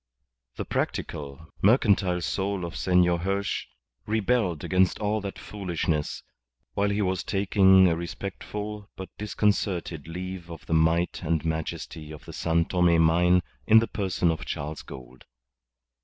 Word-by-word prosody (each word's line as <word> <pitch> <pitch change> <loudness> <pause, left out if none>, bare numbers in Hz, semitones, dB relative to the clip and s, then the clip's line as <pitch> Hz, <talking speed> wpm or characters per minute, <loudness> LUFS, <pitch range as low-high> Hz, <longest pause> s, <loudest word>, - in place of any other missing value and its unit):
The - - -4
practical, 70 +2 -4
mercantile 100 -5 +3
soul 95 +1 -2
of 85 - -7
Senor 90 -2 +3
Hirsch 100 +3 -2 0.4
rebelled 105 -6 +1
against 95 -1 +2
all 105 0 -1
that 100 -1 -6
foolishness, 85 -6 -3 0.5
while 100 0 +1
he 100 +1 0
was 95 -1 0
taking 95 -1 +5
a 85 - +2
respectful 100 +4 -6
but 95 - -7
disconcerted 100 -7 -1
leave 90 +1 -6
of 85 -2 -9
the - - -2
might 80 +2 +2
and 80 -1 -1
majesty 80 -1 -4
of 75 - -10
the - - -9
San 85 0 +1
Tome 90 -2 +3
mine 90 +2 +4 0.2
in 110 - +8
the 115 - +5
person 95 -4 0
of 80 +2 -4
Charles 75 -2 -5
Gould. 65 0 -12
90 Hz, 140 wpm, -26 LUFS, 80-100 Hz, 0.5 s, in